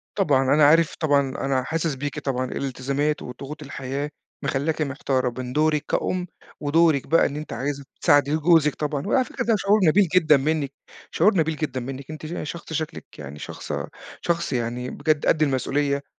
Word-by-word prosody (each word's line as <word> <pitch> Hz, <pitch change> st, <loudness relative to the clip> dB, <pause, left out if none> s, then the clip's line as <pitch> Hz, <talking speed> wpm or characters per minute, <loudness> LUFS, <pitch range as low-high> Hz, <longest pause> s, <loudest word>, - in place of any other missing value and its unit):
طبعًا. 145 Hz, -10 st, +3 dB
أنا 150 Hz, -1 st, +6 dB
عارف 160 Hz, +2 st, +4 dB
طبعًا، 145 Hz, -3 st, +3 dB, 0.3 s
أنا 130 Hz, -2 st, +1 dB
حاسِس 160 Hz, 0 st, -1 dB
بيكِ 145 Hz, +1 st, -4 dB
طبعًا، 130 Hz, -2 st, -1 dB
الالتزامات 140 Hz, +3 st, -2 dB
وضغوط 140 Hz, +5 st, -8 dB
الحياة 140 Hz, +1 st, -4 dB, 0.3 s
مخلّاكِ 145 Hz, +3 st, -1 dB
محتارة 130 Hz, -3 st, -1 dB
من 125 Hz, 0 st, -5 dB
دورِك 155 Hz, -1 st, +2 dB
كأُم 180 Hz, -1 st, -1 dB, 0.3 s
ودورِك 155 Hz, -1 st, +3 dB
بقى 165 Hz, -, +4 dB
إن 140 Hz, -, -2 dB
أنتِ 150 Hz, +1 st, -6 dB
عايزة 140 Hz, +1 st, -3 dB, 0.2 s
تساعدي 145 Hz, +1 st, +4 dB
جوزِك 155 Hz, -2 st, +4 dB
طبعًا 150 Hz, +1 st, -3 dB
وعلى 255 Hz, +4 st, +3 dB
فكرة -, -, -4 dB
ده 225 Hz, -1 st, +3 dB
شعور 205 Hz, +2 st, +3 dB
نبيل 190 Hz, +4 st, +5 dB
جدًا 155 Hz, -5 st, +5 dB
منِّك، 145 Hz, 0 st, -1 dB, 0.4 s
شعور 195 Hz, +3 st, +3 dB
نبيل 160 Hz, -1 st, +1 dB
جدًا 145 Hz, -4 st, -3 dB
منِّك 135 Hz, +3 st, -7 dB
أنتِ 155 Hz, 0 st, -8 dB
ش 160 Hz, -, -5 dB, 0.2 s
شخص 170 Hz, -1 st, -9 dB
شكلِك 160 Hz, +1 st, -4 dB
يعني 75 Hz, 0 st, -8 dB
شخصة -, -, -5 dB, 0.3 s
شخص 170 Hz, -4 st, -1 dB
يعني 120 Hz, +1 st, -2 dB
بجد 150 Hz, +1 st, 0 dB
قد 155 Hz, -, +3 dB
المسؤولية 140 Hz, +1 st, 0 dB
145 Hz, 170 wpm, -24 LUFS, 135-160 Hz, 0.4 s, أنا